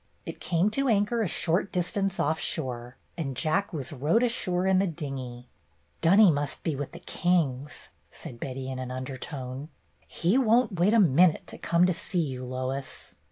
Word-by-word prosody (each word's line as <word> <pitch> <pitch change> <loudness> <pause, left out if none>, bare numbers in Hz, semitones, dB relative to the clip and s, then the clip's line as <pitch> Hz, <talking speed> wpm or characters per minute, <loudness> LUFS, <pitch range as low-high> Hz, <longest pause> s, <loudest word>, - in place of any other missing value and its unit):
It - - -7
came 180 +4 +1
to 275 +5 0
anchor 215 +2 +2
a 215 - +1
short 175 +4 0
distance 195 +2 -1
off 160 +2 +1
shore, 125 -5 -3 0.2
and 135 -5 -3
Jack 170 +7 0
was 145 -5 -5
rowed 150 - +2
ashore 185 -7 0
in 190 -1 +4
the 195 - +2
dinghy. 135 -7 -6 0.6
"Dunny 195 +3 +7
must 145 -1 -3
be 160 - -1
with 140 0 -5
the - - -9
Kings," 150 -6 -1 0.2
said 120 - -9
Betty 130 +1 -5
in 130 - -5
an 130 -1 -5
undertone. 130 +2 -6 0.4
"He 185 +10 +1
won't 230 -5 +2
wait 200 +6 +4
a - - +6
minute 170 -1 +4
to - - -8
come 170 +1 +3
to 180 - +2
see 175 0 -2
you, 130 0 -6
Lois." 130 +2 -5
160 Hz, 175 wpm, -27 LUFS, 130-190 Hz, 0.6 s, Dunny